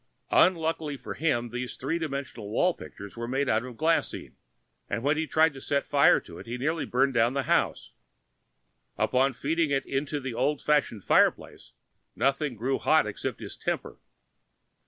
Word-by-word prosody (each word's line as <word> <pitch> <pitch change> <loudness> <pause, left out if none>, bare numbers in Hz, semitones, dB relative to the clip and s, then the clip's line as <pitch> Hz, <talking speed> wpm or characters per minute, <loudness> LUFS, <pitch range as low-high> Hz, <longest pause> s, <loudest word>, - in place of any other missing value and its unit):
Unluckily 160 -4 +2
for 125 - -7
him, 125 -7 0
these 125 +1 -4
three 160 +6 -2
dimensional 140 -9 -5
wall 180 +11 +2
pictures 100 -9 -11
were 115 0 -5
made 135 +3 0
out 110 0 +2
of 125 -2 -9
glaseine, 165 +1 0 0.6
and 115 - -2
when 145 +2 +2
he 160 +1 -1
tried 160 0 +3
setting 140 -1 -1
fire 140 -1 +5
to 85 - -12
it - - -11
he 120 +2 -4
nearly 155 +5 -1
burned 135 +2 +2
down 120 +2 +2
the 140 - 0
house. - - 0 1.1
Upon 130 +2 +2
feeding 160 +5 0
it 135 -1 +1 0.2
to 145 +1 -3
the 130 -3 -5
old 135 +5 0
fashioned 145 -9 +1
fireplace - - +1 0.4
nothing 140 -1 0
grew 125 +5 -1
hot 155 -4 +4
except 105 - -5
his - - -7
temper. - - -4
140 Hz, 165 wpm, -27 LUFS, 120-155 Hz, 1.1 s, fire